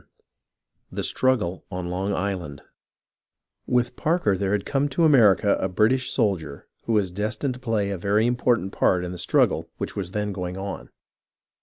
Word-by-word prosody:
CHAPTER - - -36
XII - - -25
THE - - -2
STRUGGLE 115 -9 0
ON 90 -2 -4
LONG 95 +3 -1
ISLAND 90 -7 -4 1.0
With 125 0 +1
Parker 155 - +1
there 100 +1 -1
had 105 -1 -1
come 145 +1 0
to 165 +5 0
America 105 - +5
a 95 - -1
British 125 +8 +2
soldier 90 - -1 0.2
who 115 - 0
was 100 -4 +1
destined 105 +8 -2
to 125 - -11
play 110 -5 -1
a 95 - -4
very 105 +4 +2
important 120 -5 +1
part 90 -2 +2
in 90 - -5
the 90 - -7
struggle - - +1
which - - -5
was 95 -3 -3
then 105 +1 -2
going 90 -1 -4
on. 100 +1 -6
100 Hz, 175 wpm, -24 LUFS, 90-120 Hz, 1.0 s, America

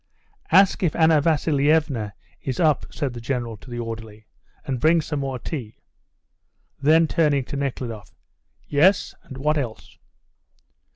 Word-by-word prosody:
"Ask 195 +3 +5
if 175 -5 +1
Anna 160 -2 +4
Vasilievna 145 - +1 0.3
is 130 - -4
up," 155 -5 +2
said 140 -5 -3
the 120 - -8
General 120 -2 -3
to 125 - -15
the 120 - -6
orderly, 110 -2 -7 0.4
"and 130 -3 -2
bring 165 +6 +4
some 150 -2 -3
more 135 -2 -3
tea." 125 -4 -6 1.1
Then, 160 +3 +5
turning 150 -4 +2
to 135 - -7
Nekhludoff, 125 -6 -4 0.5
"Yes, 175 +7 +3
and 130 - -11
what 150 +3 +1
else?" 120 -5 -7
140 Hz, 135 wpm, -23 LUFS, 120-155 Hz, 1.1 s, Ask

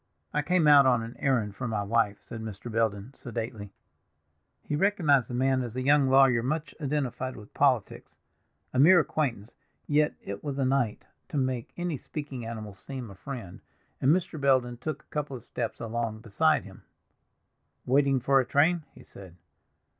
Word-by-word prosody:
"I 150 - +2
came 170 +1 +2
out 145 -2 +8
on 120 -3 +3
an 115 +2 -8
errand 115 -7 0
for 125 - -4
my 105 -3 -1
wife," 105 -1 +1
said 115 - -8
Mr. 110 +1 -7
Belden 110 +1 -1
sedately. 115 -5 -6 0.9
He 150 - -2
recognized 155 - +3
the 120 - -4
man 130 +1 +2
as 120 -2 -5
a 130 - -2
young 140 0 +4
lawyer 135 -3 +5
much 150 +6 -2
identified 130 -3 -2
with 105 0 -13
politics; 130 -8 0 0.6
a 130 - +1
mere 175 +6 +8
acquaintance, 125 -9 -2 0.3
yet 150 +1 +2
it 100 0 -6
was 140 -2 -4
a 135 - +1
night 130 -5 0 0.2
to - - -3
make 130 -3 -1
any 175 -4 -2
speaking 140 -6 -6
animal 110 -3 -6
seem 125 +2 -8
a - - -12
friend, 115 -4 -8 0.4
and 130 - +3
Mr. 170 -3 0
Belden 130 -3 +2
took 155 +6 -5
a - - -23
couple 145 -3 -3
of 120 - -16
steps 115 -2 -4
along 115 -1 -3
beside 110 -3 +2
him. - - -13 1.0
"Waiting 135 +1 +3
for 135 +2 +3
a - - +3
train?" 160 +5 +2
he - - -14
said. 95 -3 -13
130 Hz, 175 wpm, -28 LUFS, 115-145 Hz, 1.0 s, out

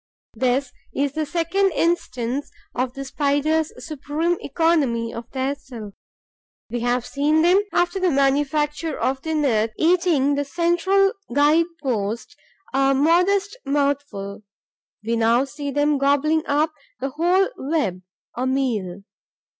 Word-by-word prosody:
This 250 +2 0 0.2
is 280 0 0
the 310 0 -2
second 350 +4 +1
instance 275 -6 -1 0.2
of 250 0 -2
the 275 0 -5
Spiders' 295 +3 0
supreme 310 +3 -1
economy 275 -7 +1
of 230 +1 -8
their 265 +1 -1
silk. 235 -7 -10 0.8
We 240 - -2
have 245 +1 0
seen 300 +3 +1
them, 365 +4 +5
after 355 +2 +1
the 370 -1 +2
manufacture 295 +2 +1
of 265 0 0
the 320 +1 -2
net, 225 -7 +1
eating 330 -5 +3
the 285 0 0
central 345 +6 +2 0.2
guide 300 +3 +4 0.2
post, 225 -3 -2 0.4
a 270 0 +3
modest 360 - +2
mouthful; 280 -9 -2 0.6
we 230 +1 0
now 230 +3 +3
see 285 +1 -6
them 290 +1 +1
gobbling 295 +3 +2
up 305 +2 +1 0.3
the 270 +2 -2
whole 350 +7 +2
web, 265 - -1 0.3
a 255 +2 -1
meal. 220 -9 -1
285 Hz, 130 wpm, -22 LUFS, 255-320 Hz, 0.8 s, them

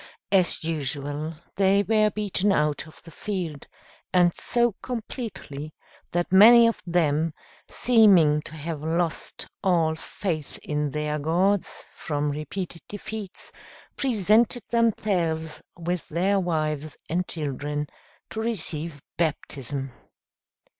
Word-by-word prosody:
As 185 -4 +3
usual, 150 0 -3 0.2
they 195 +1 +4
were 215 +1 +3
beaten 205 -1 0
out 150 -3 +1
of 155 - -15
the 165 - -12
field, 175 -7 -4 0.4
and 175 -2 +4
so 240 0 +1
completely, 215 - -6 0.4
that 175 0 -1
many 230 +5 +9
of 230 - +1
them, 160 -2 +1 0.3
seeming 190 -11 +5
to 155 - -10
have 155 -1 -5
lost 165 +1 -2 0.2
all 170 -5 +3
faith 160 -1 -4
in 150 -1 -1
their 150 +1 -2
gods, 180 +6 0
from 145 -1 -2
repeated 165 +4 -5
defeats, 205 -1 -7 0.4
presented 230 -1 +3
themselves 180 -9 0 0.2
with 175 0 -3
their 190 +5 +2
wives 155 -4 -2
and 180 +2 -1
children 145 -1 -3 0.5
to 220 - -3
receive 165 - -4
baptism. 140 -4 -2
170 Hz, 110 wpm, -25 LUFS, 150-200 Hz, 0.5 s, many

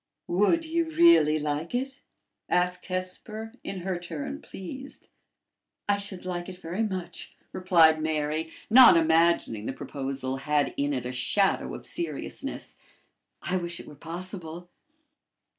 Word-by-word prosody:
"Would 210 - +2
you 335 +1 0
really 320 - +6
like 150 +6 -2
it?" 270 +2 -3 0.5
asked 180 0 0
Hesper, 200 +5 -5
in 190 -2 -5
her 185 -1 -2
turn 280 - -6
pleased. 260 +9 -9 0.8
"I 205 0 +3
should 200 -2 -5
like 175 0 -4
it 185 - -9
very 180 +3 -4
much," 185 -5 -4 0.2
replied 165 -4 +4
Mary, 155 0 -1 0.2
not 240 -5 +9
imagining 160 -9 +2
the - - -2
proposal 135 -1 -4
had 145 +1 0
in 145 +1 0
it 130 -3 -2
a 125 - -3
shadow 130 +11 +1
of - - -9
seriousness. 345 0 -4 0.7
"I 185 - 0
wish 170 -1 -5
it - - -10
were - - -11
possible." 175 +2 -8
175 Hz, 135 wpm, -27 LUFS, 155-205 Hz, 0.8 s, not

